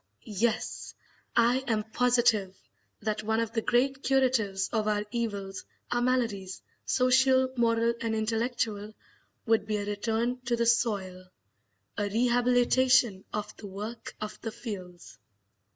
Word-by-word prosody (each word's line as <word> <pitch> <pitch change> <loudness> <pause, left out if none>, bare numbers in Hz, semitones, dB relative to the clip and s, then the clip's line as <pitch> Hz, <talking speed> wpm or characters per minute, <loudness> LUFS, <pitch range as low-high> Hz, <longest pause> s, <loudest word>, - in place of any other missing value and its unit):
Yes, 220 +1 -2 0.4
I 240 +2 +4
am 220 -2 +1
Positive 230 -6 +2 0.5
that 215 0 -1
one 220 +1 0
of 230 -1 -1
the 225 - -1
great 265 +4 +1
curatives 250 -8 +1
of 215 -2 0
our 210 0 0
evils, 205 -5 -3 0.3
our 240 - +1
maladies, 230 -7 -1 0.2
social, 260 0 +3
moral, 230 -1 +2
and 225 -1 -1
intellectual, 220 -1 -2 0.5
would 225 -2 +2
be 215 -1 0
a 205 - -3
return 225 +4 -1
to 240 0 +1
the 235 0 0
soil, 200 -6 0 0.7
a 205 0 0
rehabilitation 245 -1 +3
of 210 0 -4
the 205 - -9
work 210 +5 -7
of 215 0 -6
the 225 - -4
fields." 200 -7 -8
225 Hz, 130 wpm, -29 LUFS, 210-245 Hz, 0.7 s, I